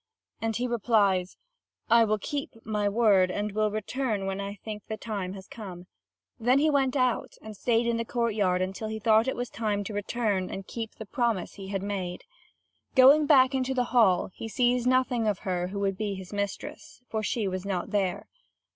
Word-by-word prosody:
And 225 Hz, -1 st, -1 dB
he 245 Hz, -, -1 dB
replies: 205 Hz, -6 st, +1 dB, 0.5 s
"I 230 Hz, 0 st, +6 dB
will 215 Hz, 0 st, +1 dB
keep 285 Hz, +5 st, -4 dB
my 210 Hz, -2 st, 0 dB
word, 200 Hz, -4 st, +4 dB
and 205 Hz, +3 st, -2 dB
will 215 Hz, +1 st, +1 dB
return 215 Hz, 0 st, -2 dB
when 195 Hz, +1 st, -2 dB
I 200 Hz, 0 st, -5 dB
think 210 Hz, 0 st, -7 dB
the 220 Hz, -, -4 dB
time 200 Hz, -4 st, -4 dB
has 190 Hz, -1 st, -10 dB
come." 185 Hz, -5 st, -9 dB, 0.5 s
Then 245 Hz, +3 st, +3 dB
he 305 Hz, +2 st, +3 dB
went 270 Hz, -2 st, +2 dB
out, 255 Hz, -3 st, +1 dB
and 215 Hz, -1 st, -10 dB
stayed 230 Hz, +3 st, +1 dB
in 235 Hz, -1 st, +1 dB
the 230 Hz, -, -1 dB
courtyard 210 Hz, -6 st, 0 dB
until 190 Hz, +4 st, -4 dB
he 220 Hz, 0 st, -4 dB
thought 220 Hz, +1 st, +3 dB
it 265 Hz, -, 0 dB
was 245 Hz, 0 st, -3 dB
time 210 Hz, -1 st, -2 dB
to 210 Hz, -, -6 dB
return 205 Hz, -2 st, -1 dB
and 195 Hz, -, -6 dB
keep 225 Hz, +1 st, -6 dB
the 220 Hz, -, -8 dB
promise 225 Hz, -4 st, -1 dB
he 195 Hz, -2 st, -9 dB
had 195 Hz, -1 st, -3 dB
made. 190 Hz, -3 st, -4 dB, 0.7 s
Going 280 Hz, +4 st, +7 dB
back 265 Hz, -2 st, +6 dB
into 265 Hz, 0 st, 0 dB
the 250 Hz, -, +2 dB
hall, 190 Hz, -8 st, +4 dB
he 225 Hz, -, -7 dB
sees 245 Hz, +1 st, +1 dB
nothing 250 Hz, -3 st, +2 dB
of 205 Hz, -3 st, +1 dB
her 180 Hz, -2 st, -1 dB
who 200 Hz, +2 st, -5 dB
would 195 Hz, -1 st, 0 dB
be 205 Hz, -2 st, -2 dB
his 190 Hz, +1 st, -9 dB
mistress; 200 Hz, +4 st, -5 dB
for 220 Hz, -, -2 dB
she 215 Hz, 0 st, -1 dB
was 185 Hz, -1 st, -3 dB
not 195 Hz, -1 st, -3 dB
there. 195 Hz, -4 st, -1 dB
215 Hz, 200 wpm, -28 LUFS, 195-240 Hz, 0.7 s, Going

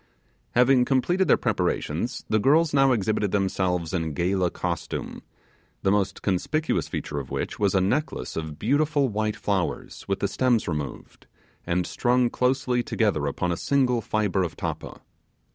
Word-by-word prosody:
Having 125 Hz, +1 st, +5 dB
completed 175 Hz, +9 st, +2 dB
their -, -, +5 dB
preparations, 100 Hz, -, -1 dB
the 110 Hz, -, +2 dB
girls 150 Hz, +7 st, +3 dB
now 135 Hz, -1 st, +5 dB
exhibited 105 Hz, -2 st, +1 dB
themselves 95 Hz, -3 st, 0 dB
in 80 Hz, -4 st, -2 dB
gala 90 Hz, +2 st, +1 dB
costume; 85 Hz, -1 st, -4 dB, 0.6 s
the 95 Hz, -, +3 dB
most 100 Hz, -1 st, 0 dB
conspicuous 155 Hz, -, 0 dB
feature 70 Hz, -, -4 dB
of 70 Hz, -, -7 dB
which -, -, -4 dB
was 100 Hz, -2 st, +2 dB
a 95 Hz, -, +4 dB
necklace 125 Hz, +11 st, -1 dB
of 80 Hz, -2 st, -5 dB
beautiful 145 Hz, -, +1 dB
white 110 Hz, 0 st, -1 dB
flowers, 95 Hz, -4 st, -2 dB
with 95 Hz, -, 0 dB
the 100 Hz, -, +1 dB
stems 120 Hz, +2 st, +1 dB
removed, 75 Hz, -6 st, -5 dB, 0.4 s
and 90 Hz, +1 st, +1 dB
strung 125 Hz, 0 st, +1 dB
closely 125 Hz, -1 st, +1 dB
together 100 Hz, -11 st, 0 dB
upon 90 Hz, +5 st, -1 dB
a -, -, 0 dB
single 125 Hz, -, +1 dB
fibre 105 Hz, -2 st, 0 dB
of 85 Hz, -3 st, -2 dB
tappa. -, -, -5 dB
105 Hz, 150 wpm, -25 LUFS, 90-125 Hz, 0.6 s, Having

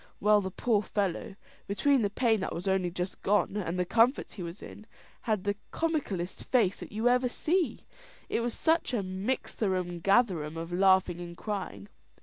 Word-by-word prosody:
Well 210 Hz, 0 st, +5 dB
the 190 Hz, -, -3 dB
poor 210 Hz, +2 st, +1 dB
fellow, 195 Hz, -2 st, -2 dB, 0.3 s
between 270 Hz, +6 st, +2 dB
the 205 Hz, -, +1 dB
pain 225 Hz, +1 st, +2 dB
that 190 Hz, -, -3 dB
was 175 Hz, +3 st, -5 dB
only 190 Hz, -2 st, +2 dB
just 180 Hz, +1 st, -5 dB
gone, 205 Hz, 0 st, +2 dB
and 180 Hz, -4 st, -2 dB
the 180 Hz, -, +1 dB
comfort 235 Hz, +8 st, +3 dB
he 195 Hz, -, -8 dB
was 170 Hz, +2 st, -7 dB
in, 215 Hz, -, -11 dB, 0.4 s
had 210 Hz, -4 st, +1 dB
the 205 Hz, 0 st, 0 dB, 0.2 s
comicalest 265 Hz, -, -2 dB
face 220 Hz, -7 st, +2 dB
that -, -, -9 dB
you 220 Hz, +3 st, 0 dB
ever 250 Hz, 0 st, +3 dB
see, 340 Hz, +7 st, 0 dB, 0.4 s
it -, -, 0 dB
was 235 Hz, 0 st, -2 dB
such 320 Hz, -5 st, +1 dB
a 205 Hz, -, 0 dB
mixtherum 185 Hz, -3 st, -2 dB
gatherum 185 Hz, -7 st, +2 dB
of 165 Hz, +1 st, -5 dB
laughing 190 Hz, -1 st, +3 dB
and 170 Hz, 0 st, -8 dB
crying. 190 Hz, -, -5 dB
200 Hz, 175 wpm, -29 LUFS, 180-230 Hz, 0.4 s, Well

